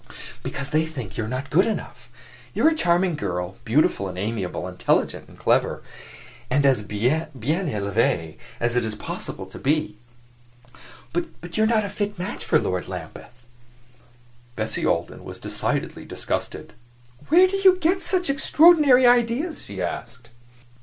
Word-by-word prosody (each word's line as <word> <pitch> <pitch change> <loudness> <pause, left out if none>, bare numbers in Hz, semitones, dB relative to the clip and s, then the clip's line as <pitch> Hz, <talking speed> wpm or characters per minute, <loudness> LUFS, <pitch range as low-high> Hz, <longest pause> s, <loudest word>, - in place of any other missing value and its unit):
"Because 140 0 -5
they 160 +1 +2
think 130 -11 -7
you 110 - -2
are 120 +4 -3
not 140 +2 -7
good 185 +8 +4
enough. 220 - -5 0.5
You - - +1
are - - +8
a - - -1
charming 175 - +2
girl, 90 -5 -3
beautiful 115 -5 +2
and 90 -1 -7
amiable, 100 -3 -3
intelligent 90 0 0
and - - -16
clever, - - +1 0.7
and 140 +2 +2
as 130 -5 +4
bien 115 +10 0
elevee 110 - -1 0.2
as 120 0 0
it 125 - +2
is 110 -1 -3
possible - - -5
to - - -11
be; 145 -7 0 1.1
but 175 0 -5
you 220 - +3
are - - +3
not 220 -2 +2
a - - -4
fit 205 0 -3
match 185 +3 -5
for 160 - +3
Lord 90 - -2
Lambeth." 95 +7 -9 1.1
Bessie 110 0 -1
Alden - - -1
was - - -8
decidedly - - -3
disgusted. - - -4 0.6
"Where 355 +5 +7
do 390 +1 -2
you 380 -1 +6
get 365 +2 +1
such 360 -2 +1
extraordinary 285 -2 +5
ideas?" 245 +7 +2
she 95 -2 -6
asked. 115 +6 -6
145 Hz, 155 wpm, -24 LUFS, -, 1.1 s, are